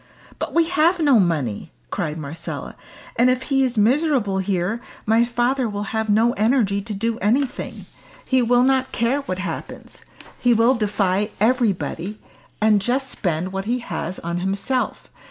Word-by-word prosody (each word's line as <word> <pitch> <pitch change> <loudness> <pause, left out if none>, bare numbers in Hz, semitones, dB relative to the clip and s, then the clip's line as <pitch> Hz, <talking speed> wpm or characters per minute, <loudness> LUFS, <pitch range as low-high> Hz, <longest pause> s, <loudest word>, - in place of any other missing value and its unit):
"But - - -4
we 335 - +5
have 345 +1 +3
no 285 -7 +5
money!" 150 - -1 0.2
cried 155 0 -2
Marcella. 155 +2 -6 0.4
"And 245 +2 +5
if 255 0 +1
he 270 - +4
is 250 -3 -1
miserable 240 -3 +2
here, 190 +3 -1 0.2
my 225 +2 +4
father 240 +1 0
will 205 0 -5
have 220 -1 -1
no 225 +3 +3
energy 215 -3 +2
to 210 +1 -5
do 225 +3 -1
anything. 250 +6 -1 0.4
He 260 -1 +2
will 245 +1 +4
not 265 0 +2
care 245 +4 +1
what 185 -10 -4
happens. 185 -4 -6 0.4
He 245 -1 +3
will 230 +3 +4
defy 205 -3 0
everybody, 210 -4 0 0.4
and 215 -1 +4
just 255 +5 -1
spend 180 -3 -2
what 195 0 -3
he 240 +3 0
has 185 -5 -5
on 170 +1 -4
himself. 195 +8 -2
220 Hz, 155 wpm, -22 LUFS, 195-255 Hz, 0.4 s, we